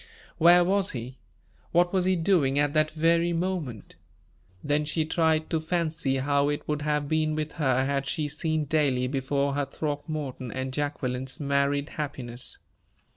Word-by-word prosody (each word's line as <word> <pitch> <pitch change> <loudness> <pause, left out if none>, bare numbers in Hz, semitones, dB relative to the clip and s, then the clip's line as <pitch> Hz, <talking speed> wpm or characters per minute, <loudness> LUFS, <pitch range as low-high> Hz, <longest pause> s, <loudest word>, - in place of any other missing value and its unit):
Where 175 +2 +7
was 195 +2 +1
he? 125 +1 -7 0.5
What 175 +1 +3
was 185 -2 +2
he 185 0 +3
doing 160 -6 +2
at 145 0 +2
that 155 -1 +3
very 165 +2 +2
moment? 165 - -3 0.7
Then 145 +1 +1
she 155 +1 -1
tried 160 -1 +1
to 165 - +2
fancy 160 -4 0
how 140 +1 +1
it 145 +1 -3
would 150 -1 -1
have 150 -1 0
been 155 0 +1
with 155 0 -3
her 130 -4 +1
had 140 0 -1
she 150 +1 -1
seen 155 +1 -1
daily 140 -4 +1
before 140 +1 0
her 145 0 0
Throckmorton 145 -4 -4
and 130 +1 -4
Jacqueline's 130 -3 -2
married 140 0 +1
happiness. 130 -5 -4
150 Hz, 155 wpm, -27 LUFS, 140-160 Hz, 0.7 s, Where